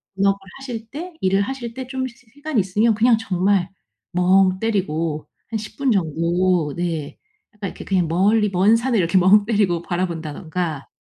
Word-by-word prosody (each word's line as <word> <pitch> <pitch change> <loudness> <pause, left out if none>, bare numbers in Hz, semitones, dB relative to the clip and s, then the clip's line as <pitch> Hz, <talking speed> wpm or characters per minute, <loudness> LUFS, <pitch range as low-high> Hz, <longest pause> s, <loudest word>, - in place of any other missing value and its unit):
본업을 195 0 +2 0.2
하실 235 -4 -7
때 340 +6 -7
일을 195 +1 +2
하실 240 0 -4
때 260 -1 -6
좀 260 -1 -3
시 240 - -13 0.2
시간이 285 -5 -1
있으면 210 +4 +2
그냥 230 +1 +4
정말 190 -2 +1 0.4
멍때리고 185 -4 +1 0.2
한 225 - -2
10 215 - -9
분 275 -3 +1
정도 170 -2 +1
네 165 -4 -3 0.4
약간 200 -2 -4
이렇게 - - -10
그냥 185 -3 +1
멀리 205 +5 +3
먼 195 +4 +4
산을 235 0 0
이렇게 170 +2 +2
멍때리고 200 -2 +4
바라 180 +2 -1
본다든가 160 -1 -4
195 Hz, 310 characters per minute, -21 LUFS, 175-225 Hz, 0.4 s, 그냥